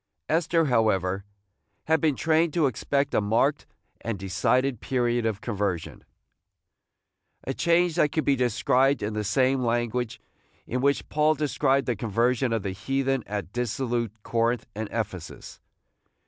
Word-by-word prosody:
Esther, 165 +1 +2
however, 100 -6 +1 0.6
had 160 -1 +2
been 155 -3 +2
trained 160 +3 +2
to 165 -3 +3
expect 140 +3 0
a - - +3
marked 115 +8 +1 0.3
and 115 -3 -3
decided 110 +7 0
period 120 -2 0
of 105 -2 -3
conversion, 100 -7 -3 0.7
– - - -53
a - - -3
change 170 0 +2
that 150 - +3
could 155 - -1
be 140 - +3
described 125 +2 +2
in 105 +1 -2
the 105 0 -2
same 130 +5 +2
language 120 0 -1 0.5
in 125 +1 -2
which 140 +1 +1
Paul 155 +1 +3
described 140 -2 +1
the 120 - 0
conversion 115 +4 0
of 115 -3 -1
the 100 - -2
heathen 135 +5 -1
at 100 -3 -5
dissolute 120 -2 -2
Corinth 115 0 0
and 105 0 -5
Ephesus. 100 -6 -5
120 Hz, 145 wpm, -26 LUFS, 110-140 Hz, 0.7 s, to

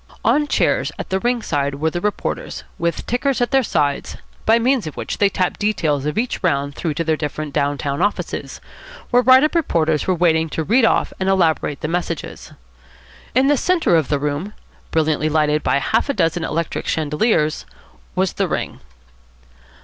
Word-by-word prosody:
On 295 0 +3
chairs - - +1
at - - -7
the 190 - +1
ring 240 +1 0
side 140 -2 -1
were 160 +3 -1
the 175 - -3
reporters, 210 +1 -3 0.2
with 170 0 -1
tickers 255 +3 0
at 245 - 0
their 270 -1 +4
sides, 145 - -1 0.3
by 225 +1 +6
means 240 -4 +1
of 155 - -8
which - - -4
they 200 - +4
tapped 185 -2 -1
details 160 -9 0
of 150 - -3
each 240 +3 -1
round 140 -5 0
through 155 0 -3
to 165 - -1
their 160 -1 +1
down 145 -1 -2
town 140 +2 -3
offices, 205 +2 -2 0.5
where 245 0 +5
write 260 +2 +6
up 305 - +1
reporters 160 - +1
were 185 - +2
waiting 160 -2 +2
to 160 - -2
read 230 - +3
off - - +1
and 190 0 0
elaborate 165 -6 +1
the - - -2
messages. 170 -1 -4 0.8
In 260 +1 +4
the 290 - +4
centre 345 - +2
of 160 -4 +2
the 145 - +1
room, 150 +8 -3 0.4
brilliantly 155 -1 +1
lighted 150 -1 +2
by - - +1
half 225 - 0
a 280 - 0
dozen 165 +1 +1
electric 165 0 -3
chandeliers, 155 +1 0 0.5
was 185 0 +1
the - - 0
ring. - - -3
165 Hz, 180 wpm, -20 LUFS, 150-220 Hz, 0.8 s, by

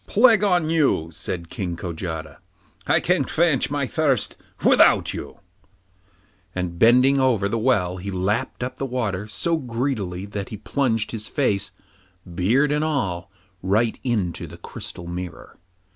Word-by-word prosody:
'Plague 225 -2 +5
on 180 -5 +3
you!' 140 - +2
said 85 +1 -5
King 90 -3 -3
Kojata. 80 -4 -5 0.5
'I - - +4
can - - +2
quench 160 -5 +1
my 145 -1 -1
thirst 135 -5 0 0.3
without - - +5
you,' - - -7 1.2
and 90 -2 -3
bending 125 +4 +5
over 120 -7 +2
the 115 +3 -1
well 95 -7 +1
he 95 +2 -6
lapped 100 +6 -1
up 130 +1 -4
the 135 - -2
water 105 -6 -2
so 135 +11 0
greedily 115 - -3
that 100 -1 -5
he 105 - -6
plunged 115 -1 0
his 110 -2 -6
face, 105 -9 0 0.6
beard 120 - +2
and 150 +1 +1
all, 95 - -1 0.3
right 105 +5 +1
into 105 -9 -1
the - - -11
crystal 85 - -8
mirror. 85 -1 -7
110 Hz, 145 wpm, -23 LUFS, 90-135 Hz, 1.2 s, Plague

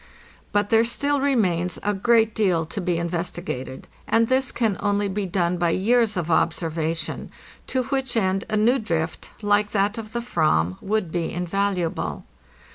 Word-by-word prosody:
But 205 0 +1
there 225 0 +6
still 285 +4 0
remains 180 - +1
a 205 - +1
great 225 +2 +3
deal 180 -7 +1
to 185 +5 -5
be 175 -2 0
investigated, 170 -6 -4 0.2
and 230 0 +3
this 260 0 +2
can 220 -5 0
only 205 0 +1
be 195 0 -2
done 175 -1 0
by 175 -1 +1
years 215 +4 +2
of 170 -1 -1
observation, 165 0 -1 0.4
to 260 -1 0
which 265 -2 -1
end 195 -2 +1
a 215 - +1
new 240 +5 +3
drift, 165 -7 -3
like 205 0 +3
that 205 +2 +1
of 220 -1 -9
the 235 - -1
"vam, 95 - +1
would 200 -4 -1
be 170 -1 -2
invaluable. 180 0 -1
200 Hz, 160 wpm, -24 LUFS, 170-225 Hz, 0.4 s, there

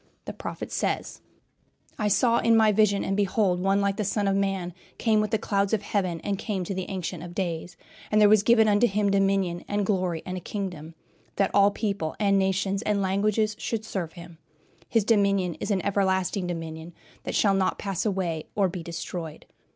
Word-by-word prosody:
The - - -5
prophet - - -6
says: - - -2 0.8
"I 210 - +1
saw 235 +3 +3
in 230 -1 +4
my 220 -1 +5
vision, 200 -1 +3
and, 195 - -1
behold, 200 -2 +1
One 195 +2 +2
like 200 0 0
the 215 - 0
Son 205 +1 0
of 195 - +2
man 195 -3 -1 0.2
came 220 -2 +2
with 215 - -1
the 220 - +1
clouds 200 -1 0
of 210 -2 +1
heaven, 185 -5 -1
and 200 -1 -2
came 200 -5 -2
to 185 - -4
the 185 -1 -4
Ancient 180 -3 -4
of 175 0 -9
days; 175 -2 -3 0.3
and 215 - +3
there 210 - +7
was 210 0 +6
given 225 0 +4
unto 210 +3 +4
him 200 -1 +1
dominion 195 -3 +1
and 205 -1 0
glory 185 -5 -1
and 185 0 -4
a - - -3
kingdom, 175 -4 -6 0.4
that 195 - +1
all 200 0 +6
people 200 -6 -3
and 200 -2 +3
nations 190 +1 0
and 210 -3 0
languages 210 +2 +1
should 220 -2 -3
serve 175 -7 -4
him. 170 -2 -12 0.5
His 225 -4 +2
dominion 200 -5 +2
is - - -4
an 195 -3 0
everlasting 190 -1 0
dominion, 165 -1 -6 0.3
that - - -4
shall 200 -2 +3
not 190 -1 +1
pass 195 -3 -3
away 185 -6 -2
or 195 -3 +2
be 180 0 -6
destroyed." 165 -1 -6
195 Hz, 195 wpm, -26 LUFS, 180-205 Hz, 0.8 s, there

